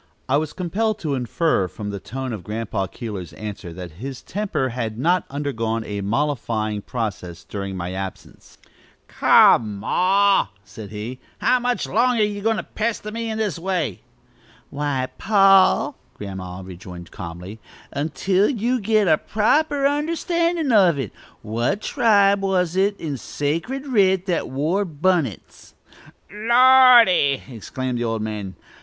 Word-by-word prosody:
I 135 - +3
was 155 0 -2
compelled 210 +5 -1
to 150 -4 -2
infer 130 - 0
from 105 +3 -6
the 100 - -5
tone 130 +3 -5
of 105 -5 -6
Grandpa 105 -2 -3
Keeler's 100 -4 -7
answer 100 -4 -7
that 90 -1 -8
his 135 -1 -6
temper 195 -10 -2
had 115 -3 -4
not 175 +7 +1
undergone 115 -6 -2
a 105 -2 -5
mollifying 110 -3 -1
process 95 -8 -5
during 100 +1 -5
my 90 0 -4
absence. 95 0 -8 0.5
"Come, 105 -3 +5
ma," 195 - +3 0.2
said 105 0 -10
he; 110 +4 -6 0.2
"how 255 - +2
much 245 0 -1
longer 235 0 +2
ye 205 -1 -2
goin' 225 +1 +1
to - - -3
pester 215 -1 -3
me 230 +1 -4
in 220 - -3
this 210 -7 -2
way?" 175 - -2 0.7
"Why, 140 -3 -1
pa," 195 -2 +4 0.2
Grandma 95 -2 -7
rejoined 90 -1 -10
calmly; 90 +4 -8 0.3
"until 185 +7 +1
you 245 0 0
git 215 -1 +2
a 155 -2 +4
proper 285 +7 +1
understandin' 335 +1 0
of 185 -8 +5
it. 130 -7 -4 0.3
What 115 - -1
tribe 200 -4 +3
was 185 -3 0
it 200 +2 +1
in 150 -4 -4
sacred 165 - -3
writ 190 -8 +2
that 175 -4 -1
wore 155 +9 0
bunnits?" 160 - -2 0.6
"Lordy!" 235 - +6
exclaimed 125 +1 -4
the - - -1
old 115 -2 -2
man. 105 -3 -5
150 Hz, 140 wpm, -22 LUFS, -, 0.7 s, Lordy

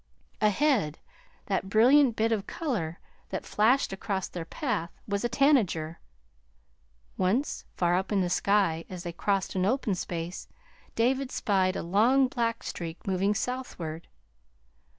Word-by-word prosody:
Ahead, 215 - +2 0.5
that 195 -1 -1
brilliant 245 +4 +5
bit 225 +1 +1
of 210 -3 -1
color 205 - -3 0.3
that - - -4
flashed 225 +1 +2
across 190 -1 -2
their 170 -2 -6
path 205 - -2 0.2
was 200 0 -1
a 240 - +1
tanager. 225 - +2 1.2
Once, 210 +10 0
far 175 -1 +2
up 190 +3 -1
in 205 - +2
the 180 - +1
sky, 190 -4 +2
as 180 -2 -7
they 175 -2 -5
crossed 195 +2 0
an 185 - 0
open 220 0 +1
space, 175 -1 -5 0.5
David 260 +3 +1
spied 190 -2 +1
a - - -3
long 235 +9 +4
black 230 -3 -1
streak 165 -1 -6
moving 195 +2 +1
southward. 180 -10 -4
200 Hz, 135 wpm, -28 LUFS, 180-240 Hz, 1.2 s, brilliant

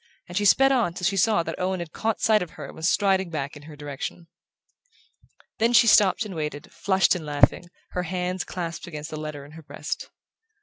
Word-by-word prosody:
and 175 - -9
she 205 +2 +1
sped 270 +6 +6
on 230 -10 +1
till 180 - -3
she 195 +2 +2
saw 205 -2 +3
that 165 0 -5
Owen 185 0 -1
had 170 -2 -6
caught 225 0 -2
sight 215 -1 +4
of 180 - -4
her - - -6
and - - -10
was 160 +2 0
striding 190 -2 +2
back 145 -3 -4
in 145 - -11
her 150 - -10
direction. 145 +3 -6 1.3
Then 230 +2 +3
she 235 - +7
stopped 205 -1 +5
and 205 - -7
waited, 150 -1 -5
flushed 190 -1 +2
and 180 -4 -4
laughing, 145 +2 +2 0.3
her 180 - -2
hands 180 +1 -2
clasped 170 -2 -5
against 150 -1 -7
the 155 - -5
letter 155 -2 -6
in 145 - -14
her 160 +1 -11
breast. 145 0 -6
175 Hz, 215 wpm, -25 LUFS, 155-195 Hz, 1.3 s, she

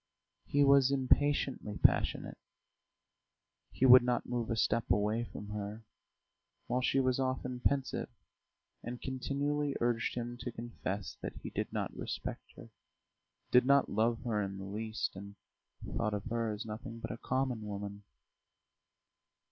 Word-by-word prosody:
He 145 0 +3
was 140 -1 +6
impatiently 135 -5 +1
passionate, - - +2 1.3
he 130 - +1
would 130 0 +10
not 120 0 0
move 120 -2 -2
a 115 - +1
step 115 +1 +1
away 105 +4 +2
from 105 -2 -9
her, 105 +1 -5 0.8
while 125 - 0
she 135 +1 +2
was 130 -1 +2
often 130 -1 -2
pensive 135 +1 0 0.7
and 120 +1 -6
continually 140 +2 -1
urged 120 -1 0
him 120 0 -4
to 125 - -4
confess 110 -4 -5
that - - -5
he - - -5
did - - -3
not - - -3
respect - - -5
her, - - -12 0.8
did 125 - +7
not 140 0 +5
love 115 +2 +1
her 110 -4 0
in 100 -1 -3
the 95 - -6
least, 110 +2 -3
and 100 +1 -9 0.5
thought 105 -2 -1
of 100 - -5
her 115 -1 0
as 105 +2 -5
nothing 115 +2 -6
but 115 - -5
a - - -5
common 130 -3 -1
woman. 100 -1 -6
120 Hz, 145 wpm, -33 LUFS, 105-130 Hz, 1.3 s, would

